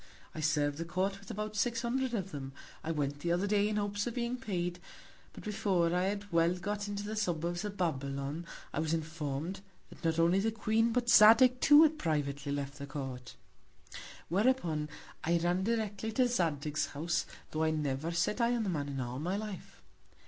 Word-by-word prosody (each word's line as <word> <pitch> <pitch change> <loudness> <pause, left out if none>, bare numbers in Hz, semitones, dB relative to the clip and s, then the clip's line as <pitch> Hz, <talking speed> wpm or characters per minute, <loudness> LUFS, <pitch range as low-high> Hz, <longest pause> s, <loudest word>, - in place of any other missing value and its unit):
I - - -6
serv'd 145 -1 +1
the - - -1
Court 190 +3 -1
with 200 - -14
about 215 +1 -4
six 230 +3 0
Hundred 250 +1 0
of 195 -3 -3
them, 135 -3 -6 0.3
I 160 - -4
went 145 -3 -1
the 170 +3 -1
other 175 +3 +1
Day 205 0 +2
in 215 - -1
Hopes 205 +1 -1
of 240 - -4
being 240 0 -1
paid; 180 -7 -3 0.5
but - - -11
before 195 -5 +1
I 180 +1 +2
had 205 +1 -3
well 165 +1 +3
got 205 +3 -3
into 205 0 -4
the 215 +1 -4
Suburbs 175 -3 -1
of 205 -1 -5
Babylon, 140 -1 -2 0.3
I - - -1
was 160 +1 +1
inform'd, 160 +3 -4 0.3
that - - -14
not 165 -1 +1
only 170 +3 +4
the 220 +3 +1
Queen, 225 +1 +1
but 245 0 0
Zadig 235 +3 +7
too 295 +2 +8
had 310 -1 +2
privately 145 -3 -1
left 140 0 -4
the 140 - -6
Court: 130 -4 -6 0.9
Whereupon 175 -7 +1 0.3
I 170 +1 +2
ran 175 +2 +1
directly 220 -1 -1
to 255 +2 +3
Zadig's 155 - 0
House, 165 +4 -1 0.2
tho' 155 - -2
I 160 - +3
never 150 0 -1
sat 170 +7 0
Eye 235 +1 +3
on 235 - 0
the 200 - -1
Man 145 -5 -2
in 135 -1 -4
all 125 +1 -4
my 180 +6 -1
Life. 210 -4 -7
175 Hz, 195 wpm, -32 LUFS, 155-210 Hz, 0.9 s, too